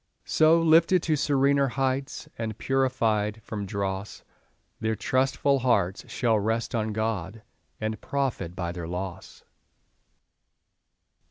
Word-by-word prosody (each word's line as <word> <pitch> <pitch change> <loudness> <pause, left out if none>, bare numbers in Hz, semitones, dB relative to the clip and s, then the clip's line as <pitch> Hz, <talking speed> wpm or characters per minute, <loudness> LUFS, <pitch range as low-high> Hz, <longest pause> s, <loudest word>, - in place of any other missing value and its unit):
So, 160 +1 +4
lifted 165 +2 +4
to 155 - +2
serener 140 -1 +2
heights, 135 +1 -2
And 110 -2 -4
purified 115 -5 0
from 105 -2 -5
dross, 100 0 -4 0.6
Their 110 0 0
trustful 135 +3 +1
hearts 100 -7 0
shall 115 -3 +1
rest 110 +2 -1
on 110 -2 -1
God, 110 -1 -3 0.4
And 110 0 -3
profit 125 -11 -2
by 85 -2 -3
their 85 -1 -6
loss. 90 +1 -6
115 Hz, 110 wpm, -26 LUFS, 100-135 Hz, 0.6 s, So